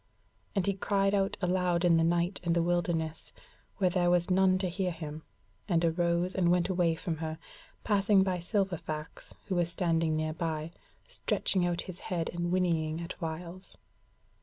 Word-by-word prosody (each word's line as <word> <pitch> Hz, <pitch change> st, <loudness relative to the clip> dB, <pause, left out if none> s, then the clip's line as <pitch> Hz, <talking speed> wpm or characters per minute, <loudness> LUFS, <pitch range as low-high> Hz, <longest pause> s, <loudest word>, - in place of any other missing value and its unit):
And 195 Hz, -3 st, +1 dB
he 200 Hz, -, +2 dB
cried 195 Hz, +1 st, +1 dB
out 195 Hz, -1 st, +1 dB
aloud 180 Hz, -1 st, +1 dB
in 170 Hz, -2 st, +5 dB
the 165 Hz, -, +3 dB
night 175 Hz, +3 st, +1 dB
and 170 Hz, -1 st, +1 dB
the 170 Hz, -, +3 dB
wilderness, 170 Hz, -2 st, -1 dB, 0.5 s
where 185 Hz, -3 st, +2 dB
there 175 Hz, -1 st, +2 dB
was 175 Hz, +1 st, +2 dB
none 185 Hz, 0 st, +4 dB
to 185 Hz, 0 st, -1 dB
hear 180 Hz, +1 st, -1 dB
him, 160 Hz, -2 st, -6 dB, 0.5 s
and 170 Hz, -2 st, +3 dB
arose 170 Hz, +2 st, +1 dB
and 180 Hz, -2 st, +2 dB
went 175 Hz, +1 st, +2 dB
away 175 Hz, -3 st, +2 dB
from 165 Hz, -1 st, -3 dB
her, 160 Hz, 0 st, -4 dB, 0.5 s
passing 200 Hz, -2 st, +4 dB
by 185 Hz, -2 st, -1 dB
Silverfax 175 Hz, -5 st, -3 dB
who 195 Hz, -, -3 dB
was 175 Hz, -1 st, +1 dB
standing 165 Hz, -2 st, +1 dB
nearby, 155 Hz, 0 st, -2 dB, 0.4 s
stretching 180 Hz, -2 st, 0 dB
out 175 Hz, -1 st, -1 dB
his 185 Hz, -1 st, -8 dB
head, 170 Hz, -3 st, -2 dB
and 175 Hz, 0 st, -2 dB
whinnying 165 Hz, -3 st, +1 dB
at 170 Hz, +1 st, -5 dB
whiles. 170 Hz, +3 st, -6 dB
175 Hz, 165 wpm, -30 LUFS, 165-185 Hz, 0.5 s, in